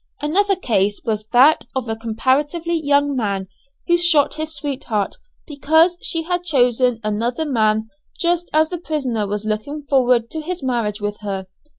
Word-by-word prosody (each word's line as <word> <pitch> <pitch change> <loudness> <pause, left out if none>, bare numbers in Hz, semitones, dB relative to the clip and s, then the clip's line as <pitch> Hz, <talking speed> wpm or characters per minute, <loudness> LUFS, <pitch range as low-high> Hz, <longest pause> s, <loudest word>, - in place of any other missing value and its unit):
Another 390 +7 +2
case 205 - 0
was 215 -1 -2
that 265 +7 +5
of 260 -2 -2
a 225 - -2
comparatively 265 +9 -1
young 285 -3 +2
man, 200 -5 -2 0.4
who 345 0 +3
shot 335 -5 +3
his 315 0 -4
sweetheart 270 -9 -3 0.3
because 320 +4 +2
she 330 -1 -1
had 355 +1 -2
chosen 250 -6 +2
another 230 +8 -1
man 220 -5 +1 0.3
just 345 0 0
as 315 +2 +2
the 355 - -3
prisoner 260 -11 -2
was 205 +1 -3
looking 220 +8 -3
forward 250 -4 +2
to 315 - -4
his 345 0 -5
marriage 230 -5 -1
with 205 0 -3
her. 195 -3 -4
265 Hz, 160 wpm, -20 LUFS, 220-315 Hz, 0.4 s, that